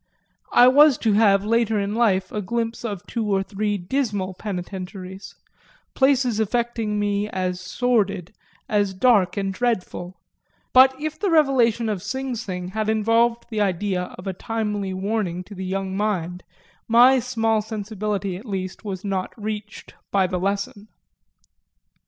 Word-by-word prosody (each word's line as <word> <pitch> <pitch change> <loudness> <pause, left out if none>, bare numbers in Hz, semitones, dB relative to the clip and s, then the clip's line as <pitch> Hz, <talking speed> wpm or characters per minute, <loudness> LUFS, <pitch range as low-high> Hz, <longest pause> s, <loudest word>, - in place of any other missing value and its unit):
I 245 - +8
was 285 +1 +6
to 220 -3 +1
have 200 -2 +4
later 225 -1 +2
in 200 +1 -2
life 195 -5 +1
a 210 - -2
glimpse 230 +4 -3
of 205 -6 -5
two 230 - -3
or 195 -1 +2
three 205 +1 -2
dismal 200 -2 -2
penitentiaries, 190 0 -7 0.6
places 260 -4 +2
affecting 225 -1 -1
me 205 0 0
as 185 -2 -2
sordid, 200 -2 0 0.3
as 205 -2 0
dark 205 -3 +3
and 195 -1 -1
dreadful; 185 -6 -2 0.5
but 260 +1 +6
if 310 +1 -4
the 405 - 0
revelation 260 -8 +3
of 205 -4 -2
Sing 265 +3 -3
Sing 185 -6 -5
had 215 +2 -2
involved 230 +2 +2
the 215 -1 -1
idea 185 -1 -1
of 180 - -10
a 190 - -2
timely 210 -1 -3
warning 190 -2 -2
to 205 - -12
the 190 -1 -6
young 190 0 -3
mind 185 -4 -2 0.5
my 245 +3 +6
small 225 -3 0
sensibility 210 -3 -3
at 205 - -12
least 190 -1 -4
was 195 -2 -5
not 190 -2 -2
reached 210 0 -6 0.2
by 195 -2 +2
the 180 0 -2
lesson. 200 +2 -3
210 Hz, 145 wpm, -23 LUFS, 190-230 Hz, 0.6 s, I